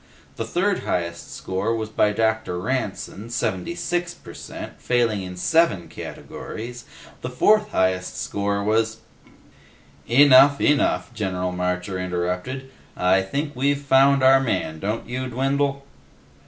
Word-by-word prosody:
The 115 - -3
third 180 - 0
highest 85 -1 -3
score 95 +5 -2
was 110 -1 -3
by 105 -1 +2
Dr. 110 -4 0
Ranson, 110 -1 -3
seventy 110 - -2
six 175 0 -2
per - - -12
cent, - - -9
failing 115 -5 +1
in 90 -1 -7
seven 160 - +2
categories. 120 +2 -8 0.4
The 125 - -4
fourth 210 +11 +3
highest 95 - 0
score 100 0 -2
was 110 +1 +1 0.6
" - - -28 0.2
"Enough. 140 0 +7
Enough," 145 -4 +1
General 90 -4 -2
Marcher 90 +1 -2
interrupted. 90 +9 -3 0.3
"I 95 +1 +3
think 140 +9 -3
we've 140 +2 +1
found 135 0 +4
our 135 +1 +7
man, 90 -11 -2
don't 105 +5 -3
you, 130 +2 -3
Dwindle?" 135 +2 -1
115 Hz, 130 wpm, -23 LUFS, 95-135 Hz, 0.6 s, Enough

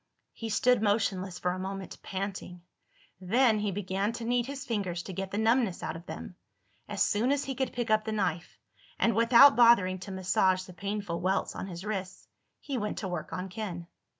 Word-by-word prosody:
He 225 - -6
stood 245 +1 +3
motionless 200 -3 0
for 180 - -1
a 185 - -4
moment, 190 0 -6
panting. 190 -2 -5 0.6
Then 220 +4 +3
he 210 0 -1
began 195 +2 -1
to 235 - -6
knead 240 0 +1
his 275 -1 -6
fingers 190 -7 -2
to 190 - -7
get 190 +1 -4
the 200 - -4
numbness 225 -3 +2
out 160 - -3
of 165 +1 -10
them. 80 +1 -8 0.5
As - - +1
soon 230 +6 +1
as 285 0 +1
he 270 - -3
could 265 0 -2
pick 240 -3 -3
up 215 0 +4
the 220 - -2
knife—and 200 +3 -3
without 235 +5 +7
bothering 215 -6 +5
to 190 +2 -8
massage 185 0 +1
the 185 - -12
painful 200 -2 -4
welts 190 +2 0
on - - -5
his 180 +1 -7
wrists—he 210 +6 -6
went 210 0 -3
to 195 - -3
work 175 -4 -5
on 185 +1 -4
Ken. 185 -4 -5
200 Hz, 190 wpm, -29 LUFS, 185-230 Hz, 0.6 s, without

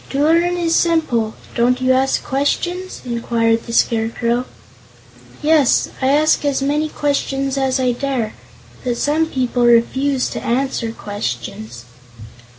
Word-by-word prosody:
"To 275 - -2
learn 340 +3 +3
is 335 -1 0
simple. 285 -10 +1 0.2
Don't 250 +2 +2
you 255 0 +2
ask 265 +1 +1
questions?" 350 +7 -2
inquired 230 -1 0
the - - -5
Scarecrow. 230 +2 +1 1.0
"Yes; 300 -4 +3
I 260 - +2
ask 300 +3 +3
as 285 -2 +1
many 295 +3 0
questions 275 -2 -1
as 265 -1 0
I 255 -1 +2
dare; 245 -3 -2 0.5
but 240 -1 -1
some 310 +4 +1
people 250 -4 -1
refuse 255 +3 +2
to - - -5
answer 245 -2 -1
questions." 120 - -6
260 Hz, 130 wpm, -18 LUFS, 235-290 Hz, 1.0 s, learn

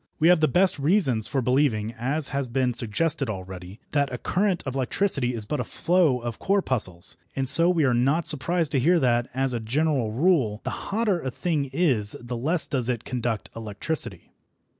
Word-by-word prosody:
We 160 +2 +3
have 180 -2 +5
the 155 - +3
best 180 -2 +2
reasons 140 - +1
for 135 -2 -1
believing, 120 -4 +1
as 135 +6 +1
has 140 -2 -2
been 125 0 0
suggested 135 +5 0
already, 95 0 -8
that 140 -2 0
a 125 - -4
current 185 - -1
of 135 - -4
electricity 135 -1 0
is 110 -2 -1
but 150 +7 -3
a - - 0
flow 170 -7 +1
of 120 -1 -6
corpuscles, 130 - 0 0.2
and 135 -1 -2
so 165 +6 +6
we 170 -4 +2
are 130 -3 +2
not 135 +8 +1
surprised 165 +1 +1
to 140 - +1
hear 170 +7 +3
that, 120 -3 +1
as 135 -1 0
a 120 - -2
general 130 0 0
rule, 130 - +1
the - - -3 0.2
hotter 205 -3 0
a 130 - -3
thing 145 +1 -2
is 130 - +1
the 120 0 -6
less 155 +8 0
does 130 -3 -1
it 120 -3 -2
conduct 120 -4 -3
electricity. 115 +8 -4
135 Hz, 190 wpm, -25 LUFS, 120-160 Hz, 0.2 s, so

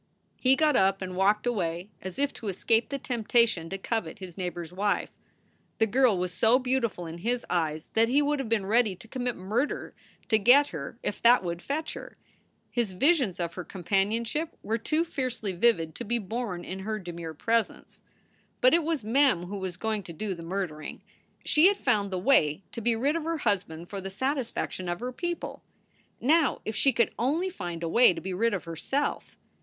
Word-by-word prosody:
He 260 +1 +5
got 300 0 +3
up 195 -1 +3
and 185 -1 -5
walked 205 +4 +2
away, 185 -4 -2
as 185 -1 -7
if 285 0 +1
to 220 - -8
escape 225 +4 +1
the 280 - -2
temptation 230 -8 +1
to 195 - -3
covet 225 +3 -3
his 185 -4 -9
neighbor 180 -2 -4
s 165 - -11
wife. 200 +3 -1 0.7
The 225 - +4
girl 235 -1 +3
was 180 0 -2
so 225 +7 +5
beautiful 250 -8 -1
in 165 +1 -7
his 240 +6 -1
eyes 160 -3 -1
that 225 +1 +3
he 270 +4 +4
would 295 0 +1
have 260 -5 -3
been 220 -4 +1
ready 215 -1 +2
to 210 - -13
commit 245 0 -3
murder 215 +10 -2 0.4
to 220 -2 +4
get 260 +7 +6
her 155 +7 -7
if - - -3
that 240 -2 +6
would 170 -1 -4
fetch 300 +7 -3
her. - - -10 0.5
His 235 -6 -1
visions 260 - +2
of 170 -1 -2
her 180 - -6
com 185 -1 -10
panionship 225 - 0
were 225 +2 -1
too 310 +8 +1
fiercely 255 - -3
vivid 175 -4 +2
to - - -6
be 240 +3 0
borne 210 -4 -4
in 190 - -5
her 215 +3 -3
demure 170 -4 -7
presence. 230 +7 -1 0.6
But 255 - +5
it 340 - +5
was 315 -5 -1
Mem 245 -4 +3
who 195 +3 -5
was 185 -2 -5
going 220 +1 -1
to 170 - -9
do 200 +4 -3
the 170 - -9
murdering. 165 -3 -5 0.4
She 310 +4 +6
had 400 0 +2
found 210 - +1
the 185 - -2
way 180 - +3
to 230 - -6
be 230 +1 +2
rid 275 +7 +1
of 335 - -2
her 330 +1 -1
husband 185 - -1
for 200 0 -6
the 195 - -5
satisfac 260 +4 -2
tion 185 -1 -5
of 175 - -2
her 250 +1 -4
people. 345 +6 -4 0.6
Now 310 +2 +3
if 220 - -3
she 275 - +4
could 235 -3 +1
only 315 +10 0
find 175 - -6
a - - -1
way 230 +1 +5
to - - -4
be 190 - -4
rid 225 +3 +1
of 190 - -4
herself. 175 - -3
215 Hz, 205 wpm, -28 LUFS, 180-255 Hz, 0.7 s, get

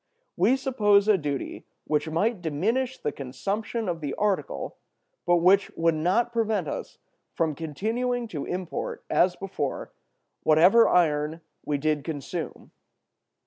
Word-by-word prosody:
We 210 +9 +4
suppose 210 -7 +3
a 215 - +6
duty 145 -6 -4 0.2
which 150 +1 0
might 195 +6 0
diminish 225 - -1
the 150 - -2
consumption 200 - -3
of 170 -2 -2
the 145 -2 -3
article, 210 - -2 0.5
but 175 - +5
which 185 +3 +4
would 165 0 +3
not 185 +10 +1
prevent 220 -7 0
us - - -5 0.4
from 160 -2 +1
continuing 230 - -2
to 150 -7 -4
import, 180 -1 -4
as 180 0 +3
before, 185 -8 -4 0.5
whatever 180 +9 +6
iron 155 -1 +2 0.2
we 145 - 0
did 150 0 0
consume. 145 -3 -5
180 Hz, 130 wpm, -26 LUFS, 155-220 Hz, 0.5 s, a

